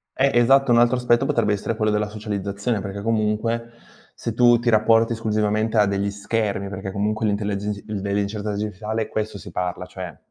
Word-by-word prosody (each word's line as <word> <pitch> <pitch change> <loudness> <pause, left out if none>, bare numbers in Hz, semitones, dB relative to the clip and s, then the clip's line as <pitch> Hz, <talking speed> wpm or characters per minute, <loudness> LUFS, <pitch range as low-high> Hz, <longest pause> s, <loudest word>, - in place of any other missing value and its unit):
Eh, 135 +1 +3
esatto, 135 +2 +4
un 115 - +6
altro 120 +1 +4
aspetto 125 +1 +2
potrebbe 115 -5 +1
essere 105 +3 -2
quello 110 0 +1
della 105 0 0
socializzazione, 105 +1 -3
perché 100 0 -5
comunque 115 +2 -1 0.4
se 115 - -4
tu 120 +1 +5
ti 120 0 0
rapporti 115 +1 +4
esclusivamente 110 0 0
a 105 - +6
degli 100 0 -1
schermi, 100 -1 -2
perché 95 0 -5
comunque 105 +3 -1
l'intellegi 105 0 -2
dellle 100 -1 -2
incerte 105 +1 -3
digitale 105 +2 -3
questo 110 -1 -3
si 85 - -10
parla 90 +1 -3
cioè, 90 -3 -8
105 Hz, 175 wpm, -22 LUFS, 100-115 Hz, 0.4 s, un